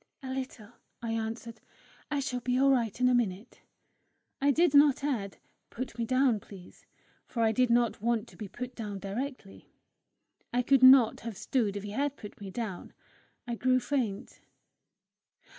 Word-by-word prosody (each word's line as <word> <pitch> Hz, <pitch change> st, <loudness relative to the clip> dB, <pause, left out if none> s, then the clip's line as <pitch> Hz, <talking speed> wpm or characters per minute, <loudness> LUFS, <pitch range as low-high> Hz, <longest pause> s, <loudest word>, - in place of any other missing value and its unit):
"A 260 Hz, -, -5 dB
little," 255 Hz, -5 st, -6 dB, 0.3 s
I 230 Hz, -, -2 dB
answered. 225 Hz, 0 st, -4 dB, 0.5 s
"I 285 Hz, -1 st, -1 dB
shall 255 Hz, -3 st, -2 dB
be 250 Hz, +1 st, -1 dB
all 275 Hz, +1 st, +4 dB
right 235 Hz, -4 st, 0 dB
in 250 Hz, -, +4 dB
a 250 Hz, -, +4 dB
minute." 225 Hz, -2 st, -2 dB, 0.8 s
I 280 Hz, -, +3 dB
did 320 Hz, +2 st, +3 dB
not 285 Hz, -1 st, +5 dB
add, 225 Hz, -9 st, -2 dB, 0.3 s
"Put 250 Hz, -1 st, -6 dB
me 230 Hz, -, 0 dB
down, 255 Hz, -2 st, +2 dB
please;" 190 Hz, -3 st, -14 dB, 0.4 s
for 230 Hz, -2 st, -1 dB
I 220 Hz, -, +4 dB
did 250 Hz, +2 st, +2 dB
not 235 Hz, -3 st, +2 dB
want 235 Hz, 0 st, 0 dB
to -, -, -17 dB
be 210 Hz, -, -7 dB
put 250 Hz, +5 st, -7 dB
down 210 Hz, -4 st, -5 dB
directly. 205 Hz, +2 st, -6 dB, 0.8 s
I 245 Hz, +1 st, +1 dB
could 270 Hz, 0 st, +4 dB
not 260 Hz, -3 st, +7 dB
have 230 Hz, -4 st, -7 dB
stood 215 Hz, -2 st, -1 dB
if 200 Hz, -, -6 dB
he 205 Hz, -, -6 dB
had 285 Hz, +5 st, -1 dB
put 210 Hz, -1 st, -11 dB
me 200 Hz, -, -6 dB
down. 195 Hz, -2 st, -6 dB, 0.5 s
I 240 Hz, -, -2 dB
grew 255 Hz, +2 st, +2 dB
faint. 245 Hz, -5 st, -3 dB
240 Hz, 170 wpm, -29 LUFS, 215-260 Hz, 0.8 s, not